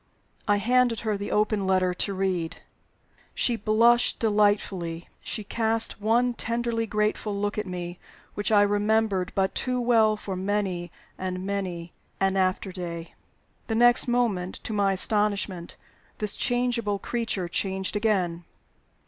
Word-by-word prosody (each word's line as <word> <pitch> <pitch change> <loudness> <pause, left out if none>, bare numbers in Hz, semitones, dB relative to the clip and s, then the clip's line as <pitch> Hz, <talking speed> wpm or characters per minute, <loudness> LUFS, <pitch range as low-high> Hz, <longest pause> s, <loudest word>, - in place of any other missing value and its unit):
I 205 -1 +4
handed 240 +2 +2
her 220 -2 -1
the 200 0 -4
open 210 -2 +1
letter 185 -1 +2
to 195 +2 -2
read. 185 -4 -2 0.7
She 240 - +2
blushed 230 +3 +3
delightfully; 205 -6 +1
she 215 - -3
cast 225 0 0
one 240 +3 +2
tenderly 235 -1 -1
grateful 210 -1 -1
look 205 0 -1
at 210 - -4
me, 175 -1 -5 0.3
which 205 +1 -1
I 205 -1 +6
remembered 205 -2 +1
but 190 -1 +1
too 250 -1 -1
well 225 -3 +3
for 195 -2 -5
many 185 -3 -2 0.3
and 185 0 -3
many 185 -4 -4 0.3
an 195 0 +2
after 190 0 0
day. 170 -2 -6 0.5
The 225 - -1
next 240 +2 +5
moment, 225 -7 0
to 220 - -4
my 200 -2 +2
astonishment, 200 -3 0 0.4
this 210 -1 -2
changeable 245 -4 0
creature 220 -4 -2
changed 190 +2 -2
again. 185 -6 0
205 Hz, 135 wpm, -26 LUFS, 185-225 Hz, 0.7 s, I